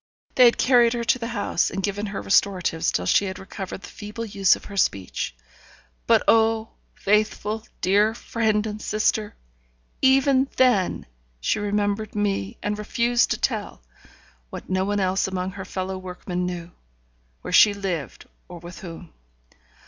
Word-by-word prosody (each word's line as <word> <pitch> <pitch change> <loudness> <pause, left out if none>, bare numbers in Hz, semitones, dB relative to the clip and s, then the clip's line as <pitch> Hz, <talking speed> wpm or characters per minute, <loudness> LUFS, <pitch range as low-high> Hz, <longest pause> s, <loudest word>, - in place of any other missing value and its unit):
They 250 - +6
had 235 - +5
carried 245 -2 +4
her 240 -1 -2
to 240 +3 +2
the 230 - -4
house, 205 -7 0
and 195 - -4
given 205 +1 -2
her 200 - -5
restoratives 185 -5 +1
till 90 - -1
she 200 - +3
had 190 -1 -5
recovered 190 -1 -7
the - - -9
feeble 210 +2 -7
use 200 -3 +3
of - - -13
her 200 - -9
speech. 95 - -1 0.7
But, - - +4
oh, 225 0 +3 0.3
faithful, 215 +2 0
dear 205 +4 +3
friend 220 -3 0
and 215 0 -5
sister! 215 0 0 0.7
even 270 0 +4
then 245 -8 +2 0.3
she - - 0
remembered 205 +1 -1
me, 195 - -1
and 210 0 -2
refused 235 +3 +1
to - - 0
tell - - -3 0.7
(what - - -8
no 185 0 +1
one 205 +1 0
else 190 0 +1
among 185 0 -3
her 190 0 -8
fellow 185 0 -4
workmen 180 -1 -4
knew), 175 -1 -6 0.7
where - - -5
she 210 - +7
lived 190 -7 -4 0.2
or 175 - -9
with 175 +1 -10
whom. 175 -2 -10
205 Hz, 155 wpm, -24 LUFS, 185-220 Hz, 0.7 s, she